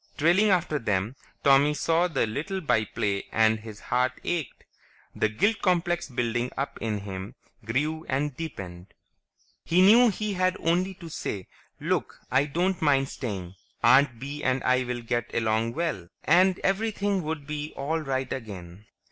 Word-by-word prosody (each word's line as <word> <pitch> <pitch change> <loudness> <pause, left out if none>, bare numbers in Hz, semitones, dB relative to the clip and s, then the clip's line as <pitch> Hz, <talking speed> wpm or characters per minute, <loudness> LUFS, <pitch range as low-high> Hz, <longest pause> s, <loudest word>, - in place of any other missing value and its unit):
Trailing 175 +8 +4
after 170 -5 +1
them, 105 +1 -1 0.3
Tommy 140 +2 +5
saw 165 +3 +2
the 150 -8 0
little 150 - -3
by 120 -10 +1
play 100 -1 -2
and 110 0 +3
his 110 -1 -10
heart 125 +1 +1
ached. 165 -8 -3 0.5
The 110 - +1
guilt 205 - +1
complex 175 -2 +1
building 120 -1 -1
up 140 +1 -3
in 110 -3 -2
him 95 -1 -7 0.3
grew 150 +8 -2
and 140 +1 -1
deepened. 95 - -8 0.7
He 180 +2 +4
knew 230 +5 +7
he 215 0 -2
had 185 +1 +1
only 180 +3 +1
to 170 -2 -10
say, 100 - -4 0.3
"Look, - - -1
I 130 +3 +4
don't 175 +5 -1
mind 140 -3 +3
staying. 95 -8 -5 0.3
Aunt 130 +1 +5
Bee 145 +3 -6
and 130 0 +1
I 130 0 +3
will 120 -1 -4
get 120 0 -2
along 110 0 +1
swell," 155 - -2 0.2
and 185 +1 +4
everything 200 -1 0
would 155 -2 -4
be 150 +1 -4
all 155 +4 -1
right 135 -3 -2
again. 100 -5 -8
140 Hz, 155 wpm, -27 LUFS, 115-170 Hz, 0.7 s, knew